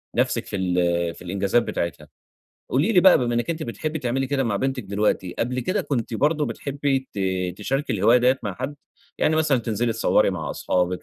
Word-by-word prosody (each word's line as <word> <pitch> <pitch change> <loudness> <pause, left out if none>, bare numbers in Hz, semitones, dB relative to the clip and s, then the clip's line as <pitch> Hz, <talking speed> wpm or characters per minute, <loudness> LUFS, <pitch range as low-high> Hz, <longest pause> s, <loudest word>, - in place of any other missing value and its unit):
نفسِك - - +1
في - - -5
ال 85 -2 0
في - - -15
الإنجازات 100 +5 +1
بتاعتها. 85 -3 -4 0.6
قولي 155 - +2
لي 180 - +6
بقى 190 0 +7
بما 120 -2 0
إنِك 120 +8 0
أنتِ 160 -1 -3
بتحبي 155 +6 -4
تعملي 130 +1 -1
كده 135 -1 0
مع 105 -4 0
بنتِك 130 -1 -2
دلوقتي، 100 -2 -1
قبل 125 +2 -1
كده 185 - 0
كنتِ 120 -4 -2
برضه 150 +4 +1
بتحبي 140 -1 -1 0.2
ت - - -5 0.4
تشاركي 135 +5 -1
الهواية 115 +4 +4
دِيَّة 125 +2 +3
مع 100 -4 -3
حد؟ 130 +6 -4 0.4
يعني 155 - +2
مثلًا 150 -5 +3
تنزلي 115 +1 -1
تصوَّري 115 -3 +3
مع 80 -6 -4
اصحابك، 90 0 -1
120 Hz, 190 wpm, -23 LUFS, 100-140 Hz, 0.6 s, بقى